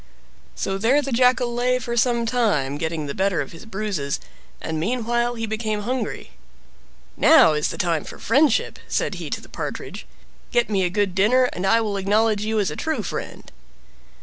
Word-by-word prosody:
So 195 0 -2
there 245 +7 +3
the 275 - -4
Jackal 250 0 +3
lay 250 +1 +1
for 235 -1 -4
some 235 0 +2
time, 185 - 0
getting 160 -1 -2
the 140 - -4
better 190 -1 0
of - - -3
his 165 +6 -12
bruises, 195 -10 -3 0.4
and 160 -1 -4
meanwhile 240 +4 0
he 225 -1 -3
became 215 -1 -2
hungry. 245 -1 -3 0.8
"Now 315 - +6
is 150 0 0
the - - -5
time 170 -5 0
for - - -10
friendship!" 280 -3 +2
said - - -1
he - - -5
to - - -3
the - - -14
Partridge. - - -6 0.4
"Get 240 -2 +1
me 195 -2 +2
a 180 - +1
good 200 0 0
dinner, 215 +7 +4
and 185 +2 -2
I 230 +3 +4
will 210 -3 -2
acknowledge 210 +2 +1
you 220 +1 -1
a 205 - +2
true 320 0 -2
friend." - - -6
220 Hz, 180 wpm, -22 LUFS, 190-240 Hz, 0.8 s, Now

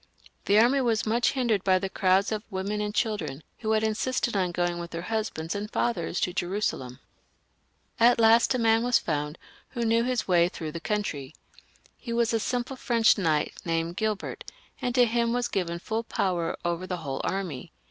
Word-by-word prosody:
The 205 - +4
army 250 +5 +5
was 230 -3 +1
much 235 +2 +2
hindered 235 -7 +1
by 190 -1 +4
the 195 +1 -2
crowds 190 +1 +2
of 215 -1 -1
women 200 +1 -2
and 210 0 -2
children 210 -10 -2 0.2
who 220 -1 0
had 220 0 +2
insisted 230 +2 0
on 185 -3 +1
going 175 0 -1
with 170 0 -6
their 170 0 -5
husbands 210 -6 -3
and 205 +1 -4
fathers 185 -8 -1
to 180 - 0
Jerusalem. 175 -10 -2 1.0
At 235 +1 +5
last 230 +2 +5
a - - +1
man 225 -1 +3
was 245 0 +4
found 150 0 -2 0.3
who 240 -3 -3
knew 230 +1 +3
his 250 -1 -1
way 175 -2 +4
through 160 -3 -6
the 170 - -5
country. 160 -8 -3 0.6
He 235 - -5
was 235 0 +1
a 225 - +2
simple 245 +3 -2
French 235 -2 +3
knight 155 -5 +1
named 165 0 -1
Gilbert, 215 0 -3 0.4
and 245 -1 -1
to 250 -1 +6
him 235 0 +1
was 245 0 0
given 180 -7 -2
full 220 +6 -3
power 180 -6 -1
over 175 +1 -2
the 180 - -3
whole 135 -1 -3
army. 175 -6 -3
210 Hz, 190 wpm, -27 LUFS, 175-230 Hz, 1.0 s, to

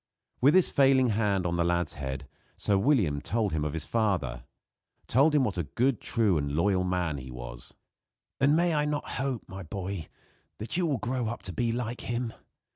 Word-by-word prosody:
With 140 +6 +6
his 185 - +5
failing 135 -2 +4
hand 100 -4 +1
on 85 0 0
the 85 - +2
lad's 85 -1 0
head, 65 -1 -5 0.3
Sir 100 - +1
William 95 - +2
told 105 -1 -1
him 75 -1 0
of 75 -1 -2
his 80 -2 -3
father 85 - -1 0.6
told 145 +5 +3
him 145 - +4
what 100 -7 -1
a - - +1
good, 125 -1 +2
true 105 -8 +2
and 70 -1 -3
loyal 95 +2 +2
man 90 -5 -1
he 65 0 -9
was. - - -9 0.6
"And 140 +2 +4
may 170 0 +3
I 150 -1 +2
not 150 0 -2
hope, 135 -4 -2
my 95 +1 -8
boy, 95 0 -5 0.5
that 110 - -5
you 175 -1 +2
will 145 -4 +1
grow 125 +2 -2
up 120 +2 -5
to 90 - -4
be 115 +5 0
like 120 0 -3
him? 120 -1 -3
105 Hz, 200 wpm, -28 LUFS, 85-130 Hz, 0.6 s, With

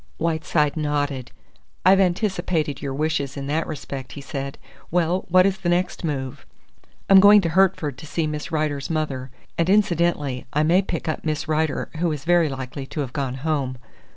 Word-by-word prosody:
Whiteside 160 -2 0
nodded. 145 -4 -1 0.6
"I've 190 +1 +7
anticipated 175 - 0
your 140 - -3
wishes 145 -2 -1
in 135 - -4
that 155 +3 -1
respect," 135 -3 -6
he 145 - -8
said. 140 0 -5 0.3
"Well, 175 +2 +1
what 185 +1 +6
is 195 -1 +1
the 180 -2 -1
next 180 +1 0
move?" 135 -5 -3 0.6
"I'm 195 -1 +8
going 205 +2 +8
to 170 - -1
Hertford 170 -6 +2
to 155 - -10
see 155 +3 -1
Miss 150 +1 -4
Rider's 150 -3 -1
mother; 145 -5 -2 0.3
and 170 +1 +2
incidentally, 170 -10 +1
I 150 - +2
may 175 +5 +4
pick 175 -4 -4
up 155 - -2
Miss 155 0 -2
Rider, 155 -1 -1
who 170 0 +1
is 145 -2 -5
very 175 -2 +4
likely 135 0 -6
to 150 - -4
have 130 -3 -5
gone 135 -3 -2
home." 140 -5 -1
155 Hz, 180 wpm, -23 LUFS, 140-175 Hz, 0.6 s, I'm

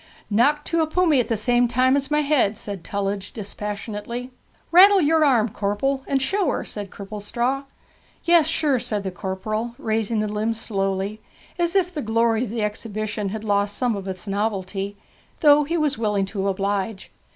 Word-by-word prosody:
'Knocked 290 +8 +3
to 335 -1 +1
a 315 - +1
pummy 320 -3 +3
at 245 - +1
the 225 - 0
same 240 +3 +3
time 255 +3 +3
as 280 -1 -1
my 300 0 +2
head,' 275 -8 +2
said 200 -5 -6
Tullidge 200 0 -3
dispassionately. 210 +4 -5 0.4
'Rattle 390 +3 +8
yer 320 -1 +3
arm, 240 -6 +3
corpel, 210 +8 -1
and 275 - +1
show 385 +7 0
her,' - - -2
said 205 -2 -6
Cripplestraw. 230 +8 -3 0.6
'Yes, 340 -2 +5
sure,' 300 -5 +1
said 210 -3 -3
the 190 - -3
corporal, 215 +5 -4
raising 220 0 -1
the 215 - 0
limb 215 +2 -1
slowly, 195 -1 -2 0.4
as 345 +1 +1
if 365 -2 +2
the 300 - -3
glory 230 0 +2
of 215 - -7
exhibition 215 -1 -3
had 215 +2 -5
lost 205 -1 0
some 245 -3 +1
of 195 -1 -6
its 185 0 -5
novelty, 200 -1 -2 0.4
though 295 -2 +6
he 335 +4 -1
was 295 -5 0
willing 210 -3 +1
to 195 0 -3
oblige. 195 +1 -2
220 Hz, 175 wpm, -23 LUFS, 205-275 Hz, 0.6 s, Rattle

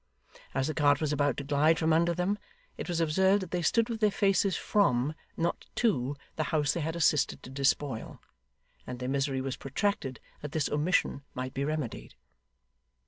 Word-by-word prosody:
As 135 -1 +1
the 155 - -1
cart 145 -2 +3
was 150 -2 0
about 145 -2 +1
to - - -3
glide 150 +3 +3
from 160 0 +2
under 170 +1 +3
them, 190 +4 0 0.4
it - - -6
was 175 -1 0
observed 190 +5 +3
that 180 - -9
they 180 - 0
stood 230 +7 +2
with 230 -2 -4
their 215 -1 +4
faces 195 -1 +2
from, 145 -9 +2 0.2
not 170 +1 -1
to, 145 - +1 0.2
the 155 - 0
house 150 -1 +1
they 170 - -2
had 160 +2 -2
assisted 150 -3 +2
to 130 - -9
despoil; 135 -2 -1 0.7
and 125 - -5
their 125 0 -4
misery 135 0 0
was 130 -1 -3
protracted 135 - -2 0.2
that 150 - -6
this 155 -3 0
omission 150 -2 +1
might 130 0 -4
be 140 - -2
remedied. 150 -4 -4
150 Hz, 185 wpm, -29 LUFS, 135-175 Hz, 0.7 s, their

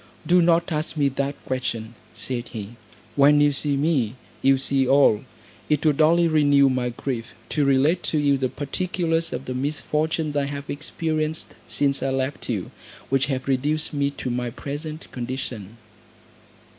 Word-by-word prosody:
"Do 180 +1 +5
not 170 +1 +3
ask 155 +1 -2
me 140 -2 +3
that 140 +1 -2
question," 120 -4 -3 0.2
said 125 -2 -3
he; 105 -3 -7 0.5
"when 145 +1 +6
you 145 0 +5
see 140 0 0
me, 135 -6 +1 0.3
you 135 0 +5
see 135 0 +2
all: 135 -6 +4 0.5
it 150 0 +1
would 150 0 +3
only 170 +2 +5
renew 145 -3 +4
my 125 -1 0
grief, 120 -1 -5
to 150 -2 +1
relate 140 +6 +3
to 155 - 0
you 145 -1 +3
the 130 -1 -1
particulars 165 +2 -1
of 125 +2 -4
the 130 - -4
misfortunes 150 +3 -1
I 145 -1 +1
have 140 0 -5
experienced 155 +1 -2
since 140 -1 +1
I - - 0
left 135 +1 -2
you, - - -2 0.4
which 135 +1 +2
have 130 -2 -3
reduced 145 +4 0
me 140 -1 +1
to 135 -3 -5
my 120 0 -2
present 150 +5 -6
condition." 120 -4 -5
140 Hz, 160 wpm, -24 LUFS, 130-155 Hz, 0.5 s, when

